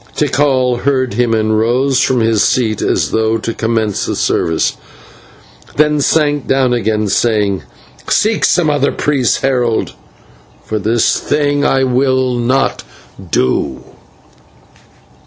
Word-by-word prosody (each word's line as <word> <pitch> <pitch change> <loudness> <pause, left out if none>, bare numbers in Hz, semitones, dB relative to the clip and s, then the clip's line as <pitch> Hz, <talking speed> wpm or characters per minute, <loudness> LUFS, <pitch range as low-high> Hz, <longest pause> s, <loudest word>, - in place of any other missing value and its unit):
Tikal 130 -4 +1
heard 130 -4 0
him 120 +1 0
and 110 0 +1
rose 130 +4 +1
from 130 -3 +1
his 110 -2 +2
seat 110 -4 0
as - - 0
though 110 0 +1
to 115 +1 -4
commence 110 -3 -1
the - - -2
service, 80 -1 0 1.0
then 150 0 +2
sank 145 -1 +1
down 135 -2 +2
again, 110 -3 -1
saying: 100 -2 0 0.5
"Seek 215 0 +1
some 175 -3 +2
other 145 -1 +1
priest, 140 -5 0
Herald, 125 -4 0 0.7
for 110 - -3
this 110 +3 +1
thing 145 -1 0
I 135 0 +2
will 130 0 +1
not 125 +3 0 0.5
do." 65 -5 -1
125 Hz, 120 wpm, -14 LUFS, 110-135 Hz, 1.0 s, his